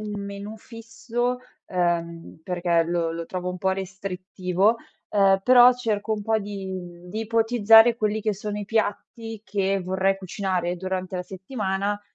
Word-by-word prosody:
un 210 -1 -5
menù 200 +2 -7
fisso, 240 +2 -4 0.3
ehm, 170 -2 -2
perché 175 -1 +1
lo 170 -1 -1
lo 165 0 -5
trovo 180 0 -4
un 180 - -6
po' 190 +1 +1
restrittivo, 190 +1 -1 0.3
ehm, 195 -1 +4
però 250 -1 +8
cerco 220 -3 -2
un 210 - -5
po' 220 +1 +1
di 190 -4 -7
di 215 +5 -4
ipotizzare 225 0 +5
quelli 215 -1 -1
che 215 0 +1
sono 210 +1 -5
i 205 - -4
piatti 225 +1 -3
che 195 0 0
vorrei 190 +1 +1
cucinare 185 -2 -2
durante 185 0 -3
la 180 - -2
settimana, 195 +1 -3
195 Hz, 150 wpm, -24 LUFS, 185-220 Hz, 0.3 s, però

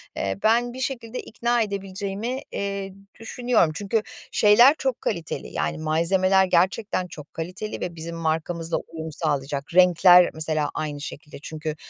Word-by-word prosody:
eee, 95 0 -2
ben 240 +2 +2
bir 260 - -8
şekilde 250 -2 -4
ikna 240 +1 -1
edebileceğimi, 200 +4 -4
eee, 200 -1 -4 0.3
düşünüyorum. 230 -6 +1
Çünkü 205 +4 -1 0.3
şeyler 235 +7 +6
çok 265 -2 -2
kaliteli, 170 -7 -3
yani, 75 - -2
malzemeler 185 +5 +3
gerçekten 185 +1 +1
çok 150 -3 -12
kaliteli 180 +6 -6
ve 175 -1 -4
bizim 165 +1 -6
markamızla 165 +1 -1
uyum 160 -1 -7
sağlayacak. 145 -2 -3
Renkler 180 0 +6
mesela 155 -1 -1
aynı 145 -2 -4
şekilde. 150 +1 -8
Çünkü, 155 -1 -5
180 Hz, 135 wpm, -24 LUFS, 160-215 Hz, 0.3 s, şeyler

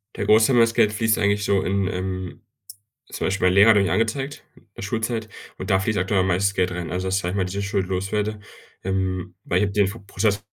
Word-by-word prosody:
Der - - -3
Großteil 110 +4 +5
meines 115 -1 +4
Geldes 105 -1 +2
fließt 110 +1 +2
eigentlich 100 0 +1
so 100 -2 +2
in, 95 0 0
ähm 95 -1 -4 0.7
zum - - -2
Beispiel 95 -1 +1
mein 90 - +3
Lehrer 100 +4 +7
hatte 105 -2 +4
mich 95 - 0
angezeigt, 135 - -2
in - - -22
der - - -7
Schulzeit. 110 +1 -2 0.3
Und - - -6
da 95 - +3
fließt 105 +2 -1
aktuell 95 +1 +1
am 95 - 0
meisten 95 +2 +1
Geld 90 -1 +1
rein. 90 -2 -5
Also, 90 +2 -3
dass, 95 +1 +1
sage 90 -2 -3
ich - - -4
mal, 95 - +1
diese 100 +2 -4
Schuld 100 -1 -1
los 95 +1 -3
werde. 105 0 -1 0.4
Ähm, 95 -1 -2
weil 90 - 0
ich - - +2
habe 100 - -4
den 100 -2 +3
Fo 110 +4 -7
Prozess-Fall 100 +1 -1
100 Hz, 245 wpm, -23 LUFS, 95-110 Hz, 0.7 s, Lehrer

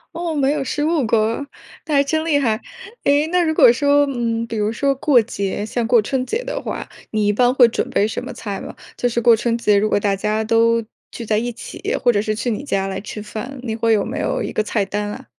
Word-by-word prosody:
哦， 340 -1 -2
没 280 -1 +1
有 295 -2 -2
失 295 +2 -3
误 315 -4 +1
过， 225 +4 +1 0.4
那 310 - -3
还 280 - +5
真 315 +3 -1
厉 305 -3 +2
害。 225 -4 0 0.4
诶， 290 +2 +3
那 360 +2 +2
如 315 -1 +1
果 240 - +7
说， 285 +2 +3
嗯， 230 -3 -2
比 230 - -5
如 210 0 0
说 275 +4 0
过 265 -2 +4
节， 205 -3 -3
像 230 +2 -2
过 230 0 +4
春 255 +4 -2
节 450 - -2
的 - - -3
话， - - -5 0.2
你 215 -1 +1
一 205 - +3
般 245 +3 +3
会 255 -2 +6
准 230 - -2
备 205 - +2
什 220 - -4
么 - - -6
菜 200 -3 -6
吗？ - - -8 0.2
就 245 - 0
是 235 - -1
过 235 0 +6
春 230 +1 -1
节， 210 -3 +3
如 215 +2 +1
果 205 - +2
大 200 -1 +1
家 210 +2 -1
都， 230 +1 +3 0.3
聚 235 - -7
在 215 0 +1
一 240 +2 -1
起， 230 - -5
或 245 -2 +4
者 205 - +2
是 215 0 -1
去 225 +3 -2
你 225 +4 -3
家 195 -8 -1
来 190 0 -4
吃 210 +1 -7
饭， 250 +6 -7
你 225 -3 -3
会 230 0 +1
有 205 -2 +1
没 275 +6 -4
有 - - -1
一 - - -4
个 215 - 0
菜 210 -1 -1
单 205 +1 -3
啊？ - - -9
230 Hz, 275 characters per minute, -20 LUFS, 215-275 Hz, 0.4 s, 果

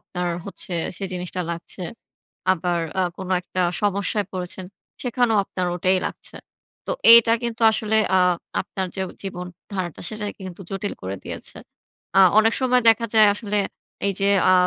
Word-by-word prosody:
আপনার 180 -1 -4 0.2
হচ্ছে 190 -1 -5 0.2
সেই 195 -2 -4
জিনিসটা 180 0 -4
লাগছে। 170 +2 -6 0.7
আবার 175 -1 -1 0.2
আ - - +3
কোন 190 -1 -7
একটা 185 - -4 0.2
সমস্যায় 200 +1 0
পড়েছেন, 185 0 -4 0.4
সেখানেও 245 -3 +2
আপনার 185 -1 -3
ওটাই 185 +1 +2
লাগছে। - - -7 0.5
তো - - -3 0.2
এইটা 230 -1 +8
কিন্তু 235 -1 -4
আসলে 220 0 0 0.2
আ - - +5 0.4
আপনার 190 -1 -4
যে 190 - -1 0.2
জীবন 180 -2 -5 0.3
ধারাটা 180 -5 -4
সেটাকে 210 -1 -5
কিন্তু 180 +1 -9
জটিল 195 +1 -3
করে 95 +1 -4
দিয়েছে। - - -7 0.6
আ - - +9 0.2
অনেক 225 +1 +5
সময় 250 -1 +3
দেখা 225 +1 +4
যায় 215 -1 +7
আসলে 210 -1 -3 0.5
এই 200 - +1
যে 195 - +2 0.2
আ - - +6
195 Hz, 155 wpm, -23 LUFS, 180-220 Hz, 0.7 s, আ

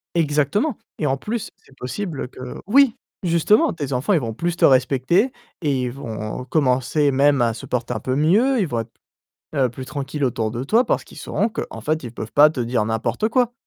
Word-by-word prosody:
exactement 160 - +1 0.2
et 155 - -1
en 135 +1 +1
plus 225 - -4
c'est 135 - -23
possible 145 0 -4
que 130 -1 -8
oui, 265 +1 +5 0.3
justement 170 +5 +3
tes 145 -4 -5
enfants 135 +11 +1
ils 170 - +4
vont 115 -1 -3
plus 170 +8 -2
te - - -2
respecter 135 - +3 0.3
et 140 -5 0
ils 125 - -2
vont 115 -1 -6
commencer 140 +1 +2
même 140 0 +3
à 115 -1 +2
se 110 - -8
porter 125 0 -2
un 110 - -3
peu 130 0 -1
mieux, 220 - +3
ils 185 - 0
vont 120 -4 -2
être, 115 - -11 0.6
heu, 130 -3 +2
plus 130 +2 -8
tranquilles 140 +1 -4
autour 115 -3 -1
de 120 +2 -4
toi 230 - +3
parce - - 0
qu'ils - - -15
sauront 220 - -1
qu'en 115 - -6
fait 155 +3 -1
ils 120 -1 -7
peuvent 110 - -6
pas 150 +1 +7
te 130 - -6
dire 115 -2 0
n'importe 115 - -1
quoi. 245 0 +1
140 Hz, 210 wpm, -21 LUFS, 125-175 Hz, 0.6 s, pas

